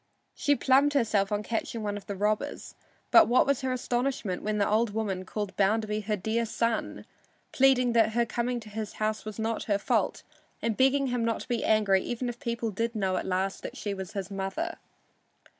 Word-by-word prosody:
She 285 - +2
plumed 280 +2 +3
herself 215 -7 +2
on 210 0 0
catching 225 0 -3
one 205 -1 -2
of 205 - -8
the 200 - -4
robbers, 210 +2 -2 0.4
but 340 - +8
what 245 +2 +4
was 280 -1 +1
her 260 -1 -1
astonishment 245 -5 -1
when 215 0 -1
the 200 - +2
old 215 0 +1
woman 195 -4 -2
called 205 -1 -4
Bounderby 210 +1 +1
her 215 0 0
dear 225 +4 -1
son, 230 0 -2 0.5
pleading 255 -2 +4
that 225 -2 +3
her 235 +1 +2
coming 240 +1 -2
to 215 - -11
his 215 0 -5
house 215 0 -2
was 215 -1 -6
not 225 0 -2
her 205 -2 +2
fault - - 0 0.4
and 230 -2 -1
begging 270 +2 +3
him 245 -1 0
not 230 0 0
to - - -9
be 240 -2 -1
angry 205 -3 +3
even 245 +3 -3
if 240 0 -7
people 235 -3 -2
did 230 +3 -2
know 190 -3 0
at - - -3
last 190 +1 -1
that - - -7
she 205 - -3
was 190 -2 -7
his 195 -1 -4
mother. 195 - -3
220 Hz, 205 wpm, -28 LUFS, 205-240 Hz, 0.5 s, but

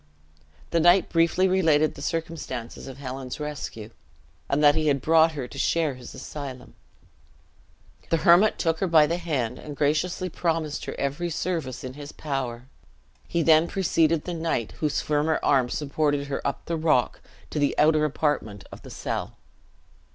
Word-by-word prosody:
The 170 - +2
knight 175 +3 +5
briefly 170 +3 +3
related 160 -5 +3
the - - -11
circumstances 160 -9 -5
of 135 -1 -9
Helen's 130 -1 -6
rescue, 145 -7 -6 0.6
and 145 +2 +1
that 145 0 +7
he 155 0 0
had 140 -2 +2
brought 160 +3 +4
her 135 -5 -5
to 135 - -11
share 160 -2 +1
his 125 -1 -11
asylum. 135 -4 -8 1.4
The 165 - +2
hermit 180 +5 +6
took 165 -2 0
her 190 - 0
by 160 -3 +6
the 170 +3 -2
hand, 145 -9 -2
and 150 -1 -8
graciously 155 +6 0
promised 160 -3 -2
her - - -5
every 145 +5 -2
service 160 -6 -3
in 130 -1 -6
his 145 +1 -9
power. 130 -5 -4 0.6
He 170 -1 0
then 160 +1 +5
preceded 165 -4 +1
the 180 - -4
knight, 160 -9 -2
whose 150 -2 0
firmer 155 +1 +1
arm 130 -4 +3
supported 145 0 -1
her 135 - -2
up 140 - -4
the 170 - -2
rock, 155 -7 +1 0.3
to 150 - -2
the 145 - +1
outer 155 0 +4
apartment 145 -9 -1
of - - -10
the - - -12
cell. - - -4
150 Hz, 165 wpm, -25 LUFS, 140-165 Hz, 1.4 s, that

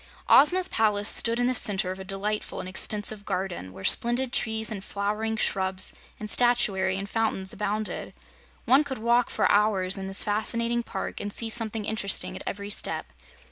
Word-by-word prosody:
Ozma's 355 +6 +5
palace 205 -2 +1
stood 230 +1 +3
in 245 - +1
the 255 - +1
center 195 -5 +4
of 190 - -7
a - - -6
delightful 200 +2 -4
and - - -6
extensive 205 +2 +1
garden, 180 - -4
where 95 - -11
splendid 240 - +1
trees 220 -1 0
and 200 -3 -6
flowering 210 +3 -3
shrubs 190 -3 -1 0.3
and 215 - -6
statuary 210 -6 +2
and 195 +1 -5
fountains 205 -3 -1
abounded. 210 +1 -3 0.5
One 270 +4 +5
could 275 -2 -6
walk 235 +2 +2
for - - +1
hours 200 -2 +1
in 190 - -5
this 195 0 +3
fascinating 230 +3 0
park - - -6
and 205 - -5
see 225 +2 -1
something 220 -2 0
interesting 205 -2 -1
at - - -8
every 200 +1 -5
step. - - -3
210 Hz, 175 wpm, -26 LUFS, 195-230 Hz, 0.5 s, Ozma's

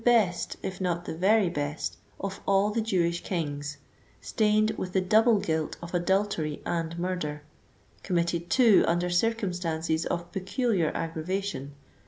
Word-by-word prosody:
best, 220 -8 +2
if 190 0 -4
not 175 -1 -1
the - - -4
very 195 +4 +4
best, 145 -3 -3 0.2
of 195 0 -4
all 195 +1 +3
the 225 +2 0
Jewish 175 -6 0
kings, 145 -5 -3 0.4
stained 215 -1 +2
with 180 -3 -5
the 190 - +3
double 220 +4 +4
guilt 160 -5 -1
of 170 +1 -9
adultery 175 -4 0
and 165 0 -2
murder, 170 -5 -3 0.6
committed, 170 -1 -1
too, 235 -4 +6
under 175 +1 +1
circumstances 175 -6 0
of 170 0 -3
peculiar 195 - 0
aggravation, 165 -1 -3
(xi. 140 - -14
180 Hz, 140 wpm, -28 LUFS, 165-200 Hz, 0.6 s, too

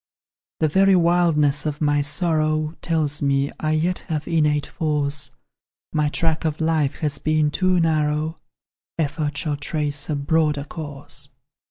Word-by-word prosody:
"The 155 - +4
very 190 +5 +4
wildness 165 -4 +3
of 150 -1 -3
my 145 -1 +2
sorrow 155 0 0
Tells 155 -4 0
me 140 0 +1
I 155 0 0
yet 170 +4 0
have 155 -3 -3
innate 150 -3 +2
force; 145 -4 -1 0.6
My 150 -1 +2
track 160 0 0
of 155 -2 -1
life 160 -3 +1
has 150 -3 -1
been 155 -1 +1
too 185 +2 +2
narrow, 155 -1 0 0.6
Effort 150 -1 -1
shall 145 -1 -1
trace 150 -1 -2
a 150 - 0
broader 150 0 +1
course. 145 -2 -5
155 Hz, 140 wpm, -22 LUFS, 145-160 Hz, 0.6 s, The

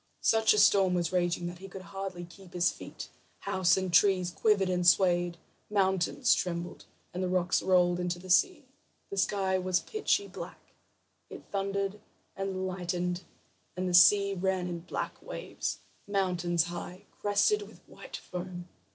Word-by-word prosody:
Such 220 0 +4
a - - -1
storm 195 -3 +5
was 175 -1 0
raging 175 -1 0
that 175 0 -6
he 195 - -9
could 190 0 -9
hardly 190 -2 -5
keep 180 +1 -16
his 175 0 +3
feet; - - -9 0.3
houses 190 -2 +2
and 185 -2 -2
trees 185 -1 +4
quivered 200 -1 +2
and 180 -1 0
swayed, 175 -1 +3 0.3
mountains 190 -3 +2
trembled, 175 -1 -3 0.3
and 180 - -3
the 185 - 0
rocks 180 -1 +1
rolled 180 -1 +3
into 180 0 -2
the 185 +1 -7
sea. 310 - +3 0.5
The 200 - -5
sky 190 -1 +1
was 185 -1 +1
pitchy 410 - -1
black; - - -10 0.6
it - - -10
thundered 200 0 -2 0.4
and 190 -1 -3
lightened, 180 -1 -3 0.5
and 185 0 -1
the 180 - -2
sea 200 +2 +6
ran 190 -1 -1
in 175 -1 -4
black 175 - -5
waves, - - -5 0.3
mountains 180 -4 +1
high, 175 +3 -7
crested 205 - +2
with 415 - -13
white - - -9
foam. 180 -1 -7
185 Hz, 155 wpm, -30 LUFS, 175-195 Hz, 0.6 s, sea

